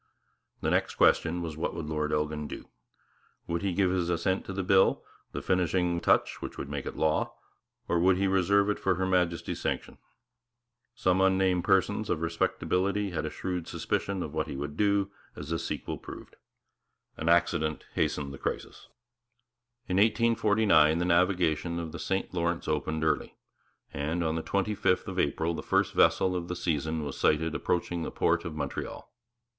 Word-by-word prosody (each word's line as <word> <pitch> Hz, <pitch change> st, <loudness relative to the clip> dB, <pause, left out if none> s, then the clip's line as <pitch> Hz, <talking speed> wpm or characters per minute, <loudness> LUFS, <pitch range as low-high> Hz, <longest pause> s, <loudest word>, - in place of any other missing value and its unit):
The -, -, 0 dB
next -, -, +1 dB
question 85 Hz, +1 st, +3 dB
was 80 Hz, -2 st, -5 dB
what 80 Hz, -, -3 dB
would 80 Hz, -, -4 dB
Lord 75 Hz, -1 st, -2 dB
Elgin 75 Hz, 0 st, -1 dB
do? -, -, -8 dB, 0.8 s
Would 85 Hz, 0 st, -2 dB
he 100 Hz, -, 0 dB
give 90 Hz, +1 st, +2 dB
his 90 Hz, -2 st, 0 dB
assent 90 Hz, +3 st, 0 dB
to -, -, -6 dB
the 95 Hz, 0 st, -2 dB
bill, 95 Hz, +1 st, +4 dB, 0.3 s
the -, -, -5 dB
finishing 90 Hz, -1 st, +1 dB
vice -, -, -13 dB
regal -, -, +7 dB
touch -, -, -11 dB
which -, -, -6 dB
would 70 Hz, -, -5 dB
make 70 Hz, -2 st, -4 dB
it -, -, -5 dB
law, 80 Hz, -1 st, +1 dB, 0.5 s
or 85 Hz, -, +1 dB
would 90 Hz, +1 st, +4 dB
he 100 Hz, -, +1 dB
reserve 95 Hz, +1 st, +3 dB
it -, -, -3 dB
for 95 Hz, -1 st, +1 dB
Her 95 Hz, +2 st, -1 dB
Majesty's 90 Hz, -2 st, 0 dB
sanction? -, -, -3 dB, 1.0 s
Some 90 Hz, +1 st, +2 dB
unnamed 95 Hz, -2 st, +2 dB
persons 100 Hz, +2 st, +2 dB
of 80 Hz, -, 0 dB
respectability 95 Hz, +4 st, 0 dB
had 85 Hz, -, -2 dB
a -, -, -2 dB
shrewd 90 Hz, -2 st, -4 dB
suspicion 100 Hz, -2 st, -2 dB
of 75 Hz, -, -7 dB
what 80 Hz, -1 st, -1 dB
he -, -, -5 dB
would 75 Hz, +2 st, -5 dB
do, 100 Hz, +1 st, +1 dB, 0.2 s
as 75 Hz, 0 st, -8 dB
the 80 Hz, 0 st, -1 dB
sequel -, -, -4 dB
proved. -, -, -10 dB, 0.8 s
An 80 Hz, -, -2 dB
accident 80 Hz, -2 st, +2 dB
hastened 70 Hz, -2 st, -1 dB
the 70 Hz, -, -9 dB
crisis. -, -, -5 dB, 1.0 s
In 90 Hz, -, 0 dB
1849 105 Hz, -7 st, +4 dB
the 85 Hz, -, 0 dB
navigation 85 Hz, -2 st, +2 dB
of 85 Hz, -2 st, -4 dB
the -, -, -7 dB
St 95 Hz, -1 st, -2 dB
Lawrence 85 Hz, -1 st, -1 dB
opened 80 Hz, +1 st, -1 dB
early; 80 Hz, -2 st, 0 dB, 0.6 s
and 80 Hz, +5 st, -1 dB
on 80 Hz, -1 st, 0 dB
the 80 Hz, -, -2 dB
twenty 100 Hz, +4 st, -1 dB
fifth 95 Hz, -2 st, +1 dB
of -, -, -3 dB
April 80 Hz, +1 st, 0 dB
the 80 Hz, -, -4 dB
first -, -, +1 dB
vessel 95 Hz, -1 st, +3 dB
of 85 Hz, -1 st, -3 dB
the 90 Hz, -, -3 dB
season 80 Hz, -2 st, -1 dB
was 70 Hz, -2 st, -6 dB
sighted 80 Hz, +1 st, +2 dB
approaching 85 Hz, 0 st, -1 dB
the -, -, -3 dB
port -, -, +1 dB
of 80 Hz, -, -5 dB
Montreal. 70 Hz, -2 st, -5 dB
85 Hz, 180 wpm, -29 LUFS, 80-95 Hz, 1.0 s, regal